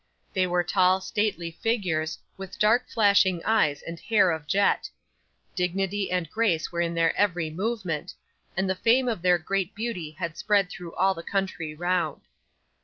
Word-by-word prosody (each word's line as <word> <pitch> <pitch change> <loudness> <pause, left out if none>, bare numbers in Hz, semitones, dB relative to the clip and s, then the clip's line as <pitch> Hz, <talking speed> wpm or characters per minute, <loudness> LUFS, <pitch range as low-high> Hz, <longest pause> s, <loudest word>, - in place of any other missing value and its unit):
They 185 -1 +2
were 175 0 +1
tall 185 +1 +3
stately 190 -4 -2
figures, 170 -6 -1 0.2
with 195 0 -9
dark 235 +4 +3
flashing 200 -5 +4
eyes 180 -11 +2
and 165 0 -7
hair 210 -5 +3
of 160 -2 -4
jet; 200 +5 +2 0.6
dignity 195 +2 -1
and 180 -2 -1
grace 210 -8 0
were 170 0 -1
in 170 0 -1
their 165 -1 +2
every 175 -6 +1
movement; 185 -4 -3 0.4
and 190 0 +1
the 190 - +1
fame 235 +7 +3
of 225 -7 -1
their 180 0 +4
great 190 +2 -2
beauty 210 -8 -4
had 170 -1 -4
spread 205 -3 +2
through 175 -2 -9
all 190 +1 +3
the 165 - -8
country 175 -5 -3
round. 175 -2 -1
185 Hz, 165 wpm, -26 LUFS, 170-205 Hz, 0.6 s, flashing